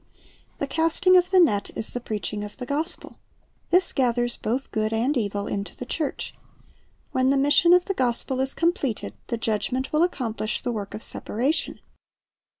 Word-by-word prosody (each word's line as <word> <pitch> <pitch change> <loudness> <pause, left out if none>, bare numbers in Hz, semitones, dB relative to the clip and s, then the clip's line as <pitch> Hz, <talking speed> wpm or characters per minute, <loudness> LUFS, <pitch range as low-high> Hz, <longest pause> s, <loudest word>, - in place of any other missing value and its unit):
The - - -1
casting 325 +6 +3
of 360 0 +5
the 375 -1 +5
net 210 - +3
is 220 - +1
the 245 - -2
preaching 210 -2 -3
of 205 0 -8
the 250 - -5
gospel. 305 +7 -4 0.5
This 360 +1 +3
gathers 240 -2 +1
both 250 +5 -3
good 215 -1 0
and 240 +6 +1
evil 205 -4 -1
into 200 0 -4
the 250 - -6
church. 300 +3 -3 0.8
When 260 0 +2
the 275 - +3
mission 290 +5 +5
of 360 0 +6
the 390 - -1
gospel 255 -2 -1
is 265 0 0
completed, 330 - -1
the 235 - -2
Judgment 230 +5 -1
will 305 - +3
accomplish 240 -10 -1
the 245 - -1
work 205 -3 -5
of 215 - -7
separation. 270 +9 -2
255 Hz, 170 wpm, -25 LUFS, 220-315 Hz, 0.8 s, of